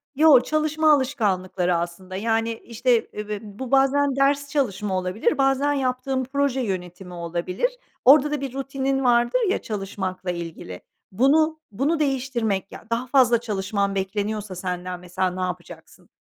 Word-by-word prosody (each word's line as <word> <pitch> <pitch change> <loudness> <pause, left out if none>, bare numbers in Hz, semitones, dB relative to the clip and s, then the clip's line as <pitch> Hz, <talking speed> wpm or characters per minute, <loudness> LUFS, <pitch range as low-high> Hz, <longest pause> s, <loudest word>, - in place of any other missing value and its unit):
Yo, 300 -2 +7
çalışma 310 +2 +2
alışkanlıkları 195 -10 0
aslında, 175 +2 -5
yani, 225 +2 0
işte, 230 +1 0
eb 210 0 -6
b 210 -1 -3
bu 220 +4 -8
bazen 275 0 +3
ders 280 +1 +2
çalışma 210 -9 -1
olabilir, 185 +4 0
bazen 270 +1 +2
yaptığın 260 -1 -1
proje 270 0 0
yönetimi 180 -3 -5
olabilir. 175 - -2 0.4
Orada 295 +3 +7
da 300 -2 -2
bir 270 -3 -4
rutinin 270 0 -2
vardır 240 - +3
ya - - 0
çalışmakla 190 -3 -4
ilgili. 165 - -7 0.3
Bunu, 310 +9 +3
bunu 285 +10 0
değiştirmek; 245 -9 -1
ya, - - -11
daha 230 +2 -1
fazla 240 -3 +4
çalışman 200 -2 -1
bekleniyorsa 205 +1 -3
senden, 180 0 -4
mesela, 180 +1 -2
ne 185 +1 -5
yapacaksın? 180 -2 -7
230 Hz, 140 wpm, -23 LUFS, 185-270 Hz, 0.4 s, Yo